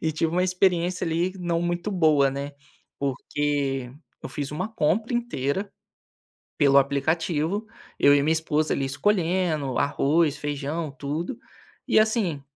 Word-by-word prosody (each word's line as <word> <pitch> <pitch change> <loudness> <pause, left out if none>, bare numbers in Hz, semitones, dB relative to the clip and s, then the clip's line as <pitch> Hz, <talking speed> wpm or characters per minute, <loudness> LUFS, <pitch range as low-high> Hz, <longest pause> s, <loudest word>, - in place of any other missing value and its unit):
e 160 - 0
tive 160 +1 -1
uma 180 +1 +2
experiência 180 -1 +1
ali 170 +3 0
não 170 -2 -1
muito 175 +4 -2
boa, 155 -7 +3
né, 140 +1 -5 0.5
porque 140 -1 -2 0.3
eu - - -5
fiz 145 -2 -4
uma 180 +8 -3
compra 220 - 0
inteira, 200 - -2 0.9
pelo 140 -2 +6
aplicativo, 160 +8 0 0.3
eu 145 0 +6
e 140 - +3
minha 160 +2 +3
esposa 155 -1 0
ali 135 - -1
escolhendo, 165 -3 0
arroz, 145 +2 +2
feijão, 145 +2 -3
tudo, 150 - -4 0.5
e - - +5
assim, 215 - +1
160 Hz, 135 wpm, -25 LUFS, 140-180 Hz, 0.9 s, pelo